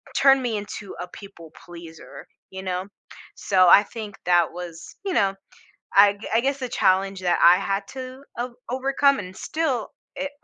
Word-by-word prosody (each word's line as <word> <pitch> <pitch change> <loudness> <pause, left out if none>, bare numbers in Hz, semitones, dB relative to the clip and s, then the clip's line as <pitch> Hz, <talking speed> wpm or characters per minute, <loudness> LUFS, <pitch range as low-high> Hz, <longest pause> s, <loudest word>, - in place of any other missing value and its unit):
turned 270 -1 +5
me 235 -4 -2
into 205 -1 -7
a 180 - -5
people 175 -5 -13
pleaser, 170 -2 -12 0.2
you 190 0 -8
know, 185 0 -3 0.5
so 185 -2 +3
I 205 - +8
think 215 -2 -8
that 175 -2 +3
was, 170 -2 -9
you 385 - -1
know, 195 -1 +2 0.6
I 200 0 +7
g 205 - -10
I 230 - +3
guess 275 +2 0
the 255 - -3
challenge 195 -4 +1
that 175 -1 +1
I 175 +1 +8
had 195 +1 -2
to 260 0 -8 0.2
o 245 0 -4
overcome 275 +2 +2
and 185 -2 -8
still 290 -8 -2 0.3
i - - -2
a 285 - -3
200 Hz, 180 wpm, -23 LUFS, 185-255 Hz, 0.6 s, I